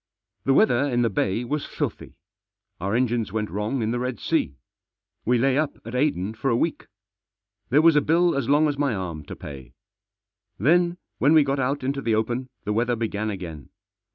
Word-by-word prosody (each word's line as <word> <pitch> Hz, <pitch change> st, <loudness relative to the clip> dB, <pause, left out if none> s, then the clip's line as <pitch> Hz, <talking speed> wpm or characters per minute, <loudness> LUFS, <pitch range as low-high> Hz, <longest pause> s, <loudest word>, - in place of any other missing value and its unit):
The 135 Hz, -, +3 dB
weather 140 Hz, -, +4 dB
in 120 Hz, -3 st, +1 dB
the 115 Hz, -, +1 dB
Bay 95 Hz, +4 st, 0 dB
was 145 Hz, +4 st, -3 dB
filthy. -, -, -4 dB, 0.6 s
Our 100 Hz, +5 st, -1 dB
engines 120 Hz, -4 st, 0 dB
went 105 Hz, 0 st, -2 dB
wrong 110 Hz, +5 st, -2 dB
in 110 Hz, -, 0 dB
the 120 Hz, -, -1 dB
Red 125 Hz, -3 st, -3 dB
Sea. 65 Hz, -, 0 dB, 0.7 s
We 125 Hz, +2 st, +3 dB
lay 135 Hz, +3 st, +2 dB
up 155 Hz, -2 st, -1 dB
at 115 Hz, -, -7 dB
Aden 125 Hz, -7 st, 0 dB
for 110 Hz, +5 st, -2 dB
a 115 Hz, -, +2 dB
week. 165 Hz, +5 st, -1 dB, 0.8 s
There 145 Hz, +5 st, +4 dB
was 165 Hz, -2 st, +6 dB
a 150 Hz, -, +5 dB
bill 170 Hz, +3 st, +3 dB
as 140 Hz, -2 st, -1 dB
long 150 Hz, +2 st, +4 dB
as 145 Hz, -1 st, -2 dB
my 140 Hz, -6 st, +1 dB
arm 85 Hz, -5 st, -5 dB
to -, -, -8 dB
pay. 70 Hz, -3 st, -10 dB, 0.8 s
Then 175 Hz, +3 st, +3 dB, 0.2 s
when 145 Hz, +3 st, +4 dB
we 155 Hz, -2 st, +7 dB
got 135 Hz, 0 st, -1 dB
out 135 Hz, +2 st, -1 dB
into 135 Hz, +1 st, -1 dB
the 115 Hz, -3 st, +1 dB
open 120 Hz, +4 st, -1 dB
the 105 Hz, -, -1 dB
weather 120 Hz, +2 st, +1 dB
began 110 Hz, -1 st, -2 dB
again. 85 Hz, -, -7 dB
125 Hz, 195 wpm, -24 LUFS, 110-140 Hz, 0.8 s, we